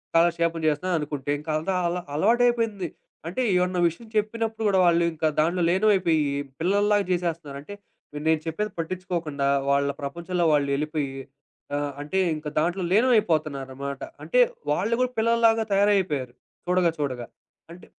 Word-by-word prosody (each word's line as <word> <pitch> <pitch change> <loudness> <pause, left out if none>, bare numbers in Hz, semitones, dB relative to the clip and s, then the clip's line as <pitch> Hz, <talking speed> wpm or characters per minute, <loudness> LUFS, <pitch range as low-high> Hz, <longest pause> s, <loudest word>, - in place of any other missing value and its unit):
కాలక్షేపం 170 0 +2
జేస్తున్నారనుకుంటే. 150 -3 -1
ఇంక 150 +2 -10
అంత 160 - -6 0.2
అలా 180 +1 -2
అలవాటైపోయింది. 225 0 +2 0.4
అంటే 190 +10 -2
ఏమన్నా 180 0 +1
విషయం 225 +8 -12
చెప్పినప్పుడు 225 +1 -1
గూడా 190 -2 +3
వాళ్ళు 170 0 +4
ఇంకా 160 0 0
దాంట్లో 170 +3 +2
లీనమైపోయి 185 -4 +3 0.4
పిల్లల్లాగా 205 +4 +2
జేసేస్తన్నారు. 170 -5 -2
అంటే, 205 +7 -10 0.5
నేను 160 -1 +3
చెప్పేది 210 +6 -2
పట్టిచ్చుకోకుండా 165 -4 -3 0.2
వాళ్ళ 140 0 +2
ప్రపంచంలో 170 +5 -2
వాళ్ళెళ్ళిపోయి, 145 0 0 0.7
ఆ! - - +1 0.2
అంటే 150 +6 -2 0.2
ఇంక 155 0 -7
దాంట్లో 175 +4 0
లీనం 240 +6 +4
అయిపోతున్నారనమాట. 140 -6 -2 0.2
అంటే - - +1 0.3
వాళ్ళు 225 +2 0
గూడా 255 0 +1
పిల్లల్లాగా 225 0 +3
తయారైపోయారు. 190 -11 +2 0.3
చూడగా. 180 -2 +3
చూడగా. 130 -5 -3 0.5
అంటే, 180 - -14
170 Hz, 125 wpm, -25 LUFS, 150-205 Hz, 0.7 s, వాళ్ళు